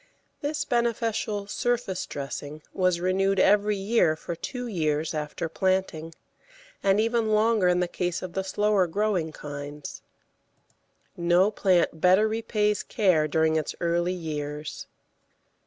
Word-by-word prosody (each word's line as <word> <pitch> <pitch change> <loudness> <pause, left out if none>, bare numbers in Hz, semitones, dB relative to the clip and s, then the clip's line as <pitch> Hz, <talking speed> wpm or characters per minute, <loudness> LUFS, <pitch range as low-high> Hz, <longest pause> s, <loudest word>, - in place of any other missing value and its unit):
This 295 +1 -2
beneficial 225 -3 -1
surface 235 -3 -2
dressing 145 +2 -6
was 185 -2 +1
renewed 190 +2 +1
every 210 +2 +4
year 195 -5 +2
for 170 +2 -6
two 250 +8 -5
years 155 -7 -1
after 150 +1 -3
planting, 165 -2 -1 0.7
and 195 +1 +3
even 230 0 +1
longer 215 -2 +3
in 180 0 +3
the 180 - +1
case 175 0 -3
of 180 -2 -6
the 190 - -1
slower 205 -1 +2
growing 185 -3 0
kinds. 145 0 -8 1.1
No 175 +4 +3
plant 180 -6 +1
better 190 +4 +5
repays 215 -1 0
care 185 -9 +2
during 160 +1 +2
its 155 - -3
early 170 +1 0
years. 150 -3 -5
185 Hz, 125 wpm, -26 LUFS, 160-210 Hz, 1.1 s, better